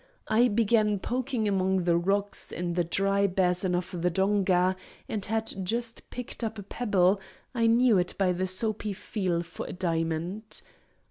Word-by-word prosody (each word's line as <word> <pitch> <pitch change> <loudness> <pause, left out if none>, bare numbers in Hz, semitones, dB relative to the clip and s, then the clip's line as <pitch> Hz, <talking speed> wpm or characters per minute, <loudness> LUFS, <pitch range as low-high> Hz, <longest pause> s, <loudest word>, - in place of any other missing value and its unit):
I 230 +3 +4
began 215 -1 +2
poking 245 +1 -1
among 190 -2 +1
the 170 -1 +3
rocks 200 +3 0
in 175 0 -3
the 175 0 +1
dry 195 +3 +2
basin 180 -1 +1
of 175 -1 -3
the 180 - +2
donga, 190 0 +2 0.3
and 210 -3 -3
had 220 +1 0
just 230 +4 -3
picked 250 -1 -6
up 225 0 -3
a 205 - -6
pebble—I 205 +2 0
knew 230 -3 +5
it 180 - -2
by 190 -2 +2
the 185 +1 -1
soapy 210 +2 -2
feel 185 -3 -2
for 170 0 -7
a - - -6
diamond. 170 +4 -2
195 Hz, 155 wpm, -28 LUFS, 180-220 Hz, 0.3 s, knew